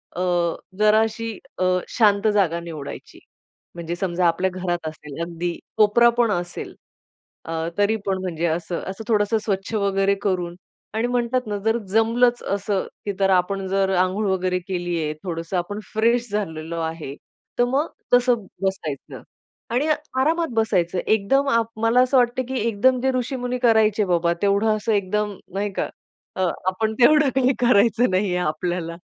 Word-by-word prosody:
अ, - - -4 0.6
जराशी 220 +1 +2 0.3
अ, 185 - +1 0.3
शांत 205 -2 +4
जागा 175 -5 +2
निवडायची. 160 -4 -8 0.6
म्हणजे 170 0 -4
समजा 180 0 -1
आपल्या 180 +3 +1
घरात 175 -3 -3
असेल, 150 0 -8
अगदी 170 0 -4 0.2
कोपरा 220 +3 +5
पण 235 -3 +3
असेल 175 -1 -4 0.7
अ, - - -6 0.3
तरी 205 +2 +3
पण 190 -1 0
म्हणजे 170 -3 -2
असं, 170 +2 -2
असं 195 +3 -6
थोडंसं 215 0 +2
स्वच्छ 200 +1 -2
वगैरे 200 -1 +2
करून. 180 -3 -1 0.4
आणि 225 +2 +1
म्हणतात 245 +1 0
ना 205 - -2
जर 225 +1 +3
जमलंच 235 +3 +3
असं 200 -1 -1 0.2
की 205 - -1
तर 195 -1 +3
आपण 190 +2 +1
जर 195 0 +1
अंघोळ 185 +4 +1
वगैरे 185 -1 0
केली 175 -2 -2
आहे, 150 - -2
थोडंसं 165 0 -3
आपण 205 +4 -3
फ्रेश 235 +1 +2
झालेलो 165 -5 -3
आहे, 160 -4 -4 0.5
तर - - +6
मग 275 +6 0 0.3
तसं 245 -3 +3 0.2
बसायचं. 160 -8 -3 0.5
आणि 255 +6 0 0.3
आरामात 325 +4 +1
बसायचं. 185 -5 +1
एकदम 270 +7 +2
आप 230 -3 +3 0.2
मला 230 +2 +5
असं 255 +1 +3
वाटतं 250 +1 +2
की 265 - -1
एकदम 250 +4 +3
जे 265 +1 +2
ऋषीमुनी 250 0 -2
करायचे 220 -2 +4
बाबा, 170 -1 +2
तेवढं 205 +2 +3
असं 215 +1 -1
एकदम, 205 +1 0 0.2
नाही 205 +1 -2
का, - - -2 0.5
अ, 190 - -2 0.3
आपण 220 +4 0
तेवढं 300 +3 +6
काही 260 0 +3
करायचं 235 +1 +4
नाहीये 185 -1 +1
आपल्याला. 170 0 -2
200 Hz, 155 wpm, -22 LUFS, 180-230 Hz, 0.7 s, तर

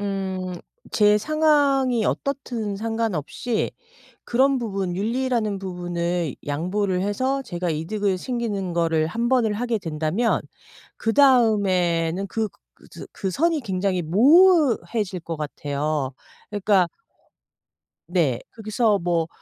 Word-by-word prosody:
음 190 -2 -3 0.4
제 210 -1 +4
상황이 280 -3 +2
어떻든 240 -8 -2
상관없이 225 - -2 0.5
그런 265 +2 +2
부분, 195 -6 -3
윤리라는 225 0 -1
부분을 175 -3 -3
양보를 180 +6 -1
해서 260 +8 0
제가 175 -8 -3
이득을 185 +5 -1
챙기는 205 -6 -3
거를 165 -2 +1
1 230 +8 -2
번을 235 -5 +2
하게 235 0 -1
된다면 160 +7 0 0.6
그다음에는 200 - +3
그 220 +1 -1 0.3
그 - - -20
즈 - - -10
그 195 - -3
선이 325 - +1
굉장히 190 -4 -1
모호해질 240 - +4
것 165 0 -5
같아요. 145 -1 -2 0.4
그러니까 200 -3 +2 1.2
네. 160 -9 +1 0.2
거기서 215 -1 +1
뭐 170 -2 0
200 Hz, 235 characters per minute, -23 LUFS, 175-235 Hz, 1.2 s, 제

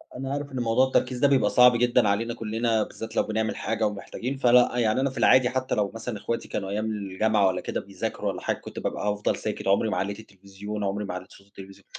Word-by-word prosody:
أ - - -6
أنا 135 +1 -4
عارف 145 0 -4
إن 130 - -4
موضوع 120 +3 +3
التركيز 125 -1 0
ده 140 - +5
بيبقى 140 -2 +3
صعب 125 -1 +6
جدًا 120 -2 +3
علينا 115 +4 0
كلّنا، 115 0 0
بالذات 115 +1 -8
لو - - +3
بنعمل 110 0 -2
حاجة 110 -1 -1
ومحتاجين، 120 +6 -5
فلأ 125 -1 +4
يعني 115 0 +2
أنا 135 - +1
في 130 - -11
العادي 130 -1 +5
حتّى 130 0 -1
لو 100 -2 0
مثلًا 115 -1 -5
إخواتي 115 +3 -4
كانوا 95 - -4
أيام 105 +2 -2
الجامعة 105 0 +1
والّا 90 -1 -1
كده - - -3
بيذاكروا - - -5
والّا - - -5
حاجة - - -1
كنت - - -9
بابقى - - -3
هافضل 105 0 -1
ساكت، - - -4
عمري 100 +3 +3
ما - - -1
علّيت 100 +2 -2
التلفزيون 100 +1 -8
عمري 100 +1 -2
ما 95 - -5
علّيت 90 +1 -8
صوت 100 - -17
التلفزي 95 -1 -13
110 Hz, 235 wpm, -26 LUFS, 100-125 Hz, -, صعب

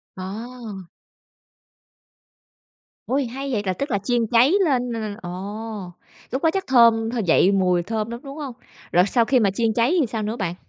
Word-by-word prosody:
À. 205 0 -7 2.2
Ôi, 275 +1 0
hay 270 +3 -5
vậy, 215 -5 0
là 185 - 0
tức 280 +8 -4
là 200 - +2
chiên 235 +2 0
cháy 240 - +4
lên 250 -5 0
là 230 - -3
là 215 -2 -4
ồ. 175 - -6 1.0
Lúc 260 +5 -3
đó 325 - +5
chắc 385 -1 -2
thơm 230 -3 +5
thơ 240 - -2
dậy 175 +3 +4
mùi 180 -3 +2
thơm 220 +3 -3
lắm, 235 - -6
đúng 275 +1 -9
hông? 285 -5 -5 0.4
Rồi 180 +1 +5
sau 230 +3 +2
khi 260 0 +3
mà 200 -4 +2
chiên 225 +2 0
cháy 245 +10 +2
thì 300 - +3
sao 220 -1 -3
nữa 215 +2 -2
bạn? 185 -7 -3
230 Hz, 190 wpm, -22 LUFS, 200-255 Hz, 2.2 s, đó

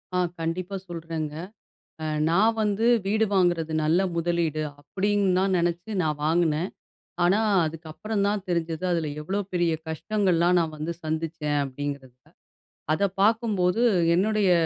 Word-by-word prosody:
ஆ, - - +2 0.2
கண்டிப்பா 180 +4 -3
சொல்றேங்க. 165 -3 -5 0.7
அ - - -2 0.2
நான் 210 +7 +3
வந்து 210 +2 +1 0.2
வீடு 220 +2 +2
வாங்குறது 175 -4 +2
நல்ல 160 +4 +3 0.2
முதலீடு 165 -2 0 0.2
அப்டின்னு 200 +2 0
தான் 190 0 +2
நெனச்சு 175 +3 -1
நான் 155 -2 -1
வாங்குனேன். 165 +1 +1 0.5
ஆனா, 190 +4 +4 0.3
அதுக்கப்புறம் 165 +7 -3
தான் 205 -1 0
தெரிஞ்சது, 170 -1 -2
அதுல 165 -3 0
எவ்ளோ 190 +6 -2
பெரிய 175 -2 +2 0.2
கஷ்டங்கள்லாம் 175 +1 +1
நான் 160 -2 -2
வந்து 155 +3 -3
சந்திச்சேன் 155 -1 -2
அப்படிங்கிறத. 140 -1 -5 0.8
அத 155 - 0 0.2
பார்க்கும்போது, 215 -2 +2 0.3
என்னுடைய 205 +1 +2
170 Hz, 125 wpm, -25 LUFS, 160-195 Hz, 0.8 s, ஆனா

